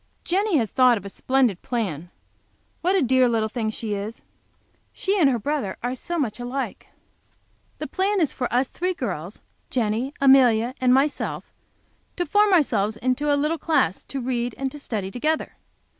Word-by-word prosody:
Jenny 385 Hz, 0 st, +1 dB
has 225 Hz, -6 st, 0 dB
thought 250 Hz, -2 st, +5 dB
of 200 Hz, -, -8 dB
such 200 Hz, -, -8 dB
a -, -, -22 dB
splendid 255 Hz, -8 st, +1 dB
plan! 180 Hz, -, -3 dB, 0.7 s
What 365 Hz, +3 st, +2 dB
a 370 Hz, -, +3 dB
dear 255 Hz, 0 st, +4 dB
little 220 Hz, -2 st, 0 dB
thing 220 Hz, -1 st, -2 dB
she 215 Hz, -1 st, -4 dB
is! 205 Hz, +3 st, -5 dB, 0.7 s
She 395 Hz, +1 st, -1 dB
and 295 Hz, -6 st, +5 dB
her 250 Hz, -, +1 dB
brother 235 Hz, -5 st, -2 dB
are 245 Hz, +1 st, -1 dB
so 345 Hz, +7 st, -4 dB
much 245 Hz, -8 st, -2 dB
alike! 250 Hz, +3 st, -4 dB, 0.9 s
The -, -, -4 dB
plan 395 Hz, +1 st, 0 dB
is 315 Hz, -5 st, +1 dB
for 250 Hz, -, -3 dB
us 250 Hz, +2 st, +2 dB
three 365 Hz, +5 st, -2 dB
girls, 185 Hz, -, -5 dB, 0.3 s
Jenny, 235 Hz, +2 st, -1 dB
Amelia 255 Hz, -3 st, +5 dB
and 255 Hz, -1 st, +4 dB
myself, 275 Hz, +3 st, 0 dB, 0.6 s
to 350 Hz, -, -1 dB
form 415 Hz, +1 st, +3 dB
ourselves 220 Hz, -, +2 dB
into 255 Hz, +5 st, 0 dB
a 285 Hz, -, +3 dB
little 305 Hz, +3 st, 0 dB
class 250 Hz, -, +1 dB
to 275 Hz, -, -5 dB
read 245 Hz, -1 st, -2 dB
and 270 Hz, -1 st, -2 dB
to 295 Hz, -, -9 dB
study 205 Hz, -8 st, -4 dB
together. 310 Hz, +8 st, -1 dB
255 Hz, 175 wpm, -24 LUFS, 225-295 Hz, 0.9 s, thought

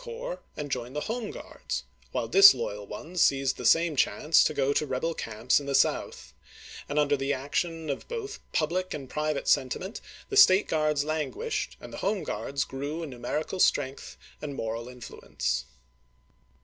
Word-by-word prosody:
corps -, -, -6 dB, 0.2 s
and 145 Hz, -1 st, -5 dB
to -, -, +2 dB
join 125 Hz, 0 st, -4 dB
the 150 Hz, -, -2 dB
Home 230 Hz, +2 st, -3 dB
Guards, -, -, -6 dB, 0.3 s
while 115 Hz, -, -2 dB
disloyal 115 Hz, -, +6 dB
ones 165 Hz, +11 st, -4 dB
seized 135 Hz, -1 st, +3 dB
the -, -, 0 dB
same 165 Hz, -1 st, +4 dB
chance 150 Hz, +5 st, +3 dB
to -, -, +2 dB
go 140 Hz, +1 st, +2 dB
to 150 Hz, -, 0 dB
rebel 135 Hz, +6 st, -1 dB
camps 115 Hz, -1 st, 0 dB
in 140 Hz, -, -8 dB
the 140 Hz, -, 0 dB
South; -, -, 0 dB, 0.6 s
and 145 Hz, -, -3 dB
under 145 Hz, -1 st, +3 dB
the 135 Hz, 0 st, -1 dB
action 160 Hz, +4 st, -2 dB
of 140 Hz, -, -4 dB
both 440 Hz, -3 st, -5 dB
public 180 Hz, +4 st, -1 dB
and 140 Hz, -3 st, -7 dB
private 150 Hz, -1 st, -2 dB
sentiment 180 Hz, -, 0 dB, 0.3 s
the 405 Hz, -, -1 dB
State 205 Hz, -, +7 dB
Guards 150 Hz, -2 st, +1 dB
languished 160 Hz, -, -3 dB
and -, -, -11 dB
the -, -, -6 dB
Home 200 Hz, -2 st, 0 dB
Guards 140 Hz, 0 st, -2 dB
grew 145 Hz, +5 st, -5 dB
in 155 Hz, -, -6 dB
numerical 140 Hz, +9 st, -3 dB
strength 140 Hz, -5 st, +1 dB, 0.2 s
and 145 Hz, -2 st, -5 dB
moral 115 Hz, 0 st, -4 dB
influence. 65 Hz, -, -4 dB
150 Hz, 170 wpm, -28 LUFS, 130-170 Hz, 0.6 s, State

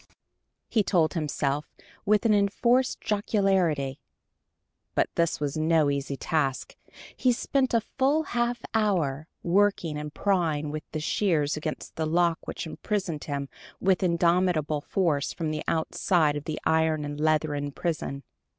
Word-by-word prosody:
he 220 Hz, -, +2 dB
told 170 Hz, -5 st, +2 dB
himself, 150 Hz, -3 st, -2 dB, 0.3 s
with 210 Hz, +2 st, +3 dB
an 220 Hz, -, +5 dB
enforced 235 Hz, +5 st, +2 dB
jocularity. 190 Hz, -10 st, +1 dB, 1.0 s
But -, -, +1 dB
this 170 Hz, -1 st, +1 dB
was 145 Hz, 0 st, -2 dB
no 155 Hz, -2 st, +3 dB
easy 140 Hz, 0 st, -3 dB
task. 135 Hz, -4 st, -1 dB, 0.4 s
He 255 Hz, -, +3 dB
spent 260 Hz, +2 st, 0 dB
a 230 Hz, -, +4 dB
full 275 Hz, +7 st, +1 dB
half 240 Hz, -3 st, -1 dB
hour, 165 Hz, -10 st, +1 dB, 0.2 s
working 175 Hz, -4 st, +2 dB
and 150 Hz, 0 st, -6 dB
prying 160 Hz, -6 st, 0 dB
with 155 Hz, 0 st, -6 dB
the 155 Hz, -, -3 dB
shears 155 Hz, -3 st, +1 dB
against 155 Hz, 0 st, -5 dB
the 160 Hz, -1 st, 0 dB
lock 170 Hz, 0 st, +1 dB
which -, -, -4 dB
imprisoned 175 Hz, -2 st, -3 dB
him 140 Hz, -1 st, -3 dB, 0.3 s
with 190 Hz, -1 st, +2 dB
indomitable 170 Hz, -3 st, +2 dB
force 155 Hz, -5 st, 0 dB
from 160 Hz, -3 st, -3 dB
the 155 Hz, 0 st, -3 dB
outside 160 Hz, -1 st, +1 dB
of 145 Hz, 0 st, -5 dB
the 155 Hz, -, -3 dB
iron 160 Hz, -1 st, +2 dB
and 145 Hz, 0 st, -5 dB
leathern 150 Hz, -2 st, +1 dB
prison. 140 Hz, -3 st, -3 dB
160 Hz, 140 wpm, -27 LUFS, 150-195 Hz, 1.0 s, an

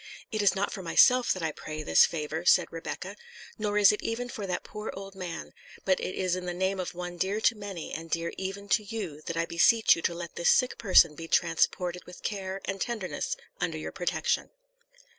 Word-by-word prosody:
"It 215 Hz, -2 st, 0 dB
is 205 Hz, -1 st, +4 dB
not 195 Hz, +1 st, -1 dB
for 190 Hz, -, -5 dB
myself 250 Hz, +8 st, +5 dB
that 185 Hz, -, -1 dB
I 160 Hz, -, 0 dB
pray 155 Hz, +1 st, -7 dB
this 80 Hz, -, +6 dB
favour," 160 Hz, 0 st, -4 dB
said 180 Hz, 0 st, +4 dB
Rebecca; 185 Hz, +4 st, -6 dB, 0.4 s
"nor 210 Hz, -1 st, 0 dB
is 205 Hz, -1 st, +7 dB
it 210 Hz, -, -3 dB
even 245 Hz, +2 st, -3 dB
for 210 Hz, -5 st, -5 dB
that 180 Hz, -1 st, -2 dB
poor 210 Hz, +1 st, -7 dB
old 195 Hz, 0 st, -8 dB
man; 180 Hz, -3 st, -6 dB, 0.3 s
but 190 Hz, -1 st, +3 dB
it 185 Hz, -, -4 dB
is 185 Hz, -1 st, 0 dB
in 180 Hz, 0 st, -5 dB
the 175 Hz, -, -3 dB
name 190 Hz, +1 st, 0 dB
of 180 Hz, -1 st, -4 dB
one 175 Hz, 0 st, -6 dB
dear 195 Hz, +4 st, 0 dB
to 230 Hz, -, +4 dB
many, 200 Hz, -5 st, -7 dB
and 165 Hz, +1 st, -6 dB
dear 165 Hz, +1 st, -2 dB
even 195 Hz, +1 st, -5 dB
to 210 Hz, +4 st, +3 dB
you, 200 Hz, -9 st, -5 dB
that 170 Hz, -, -3 dB
I 165 Hz, -, +1 dB
beseech 215 Hz, +7 st, +5 dB
you 165 Hz, -, -5 dB
to 170 Hz, -, 0 dB
let 170 Hz, -1 st, -7 dB
this 170 Hz, -, +3 dB
sick 255 Hz, -1 st, +3 dB
person 180 Hz, -6 st, +6 dB
be 165 Hz, +2 st, -8 dB
transported 175 Hz, +2 st, +1 dB
with 180 Hz, -, -13 dB
care 195 Hz, -2 st, -3 dB
and 195 Hz, 0 st, -4 dB
tenderness 235 Hz, -, -2 dB, 0.2 s
under -, -, -1 dB
your -, -, -5 dB
protection." -, -, -1 dB
185 Hz, 215 wpm, -28 LUFS, 170-205 Hz, 0.4 s, is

